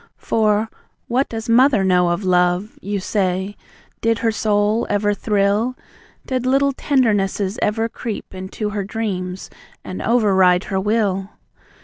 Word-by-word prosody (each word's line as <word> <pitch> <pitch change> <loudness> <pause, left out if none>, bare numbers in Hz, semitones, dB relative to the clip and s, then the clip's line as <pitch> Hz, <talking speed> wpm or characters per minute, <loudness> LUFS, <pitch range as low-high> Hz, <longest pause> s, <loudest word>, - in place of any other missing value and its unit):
For 215 0 +1 0.4
"What 255 +3 0
does 225 -1 -5
Mother 240 -2 +4
know 180 -2 +3
of 175 +4 -1
love?" 180 +2 +1
you 200 0 -3
say. 190 0 -1 0.5
"Did 230 0 +2
her 230 -1 +1
soul 215 +1 +1
ever 205 0 +1
thrill? 205 +4 0 0.5
Did 255 -2 -2
little 275 +1 +3
tendernesses 210 -7 0
ever 225 +2 +1
creep 230 -3 -6
Into 190 +3 -5
her 205 -1 -2
dreams, 190 -3 -4 0.3
and 185 - -6
over 225 -4 +2
ride 180 -1 +4
her 190 - +2
will? 200 -2 0
205 Hz, 135 wpm, -20 LUFS, 190-225 Hz, 0.5 s, Mother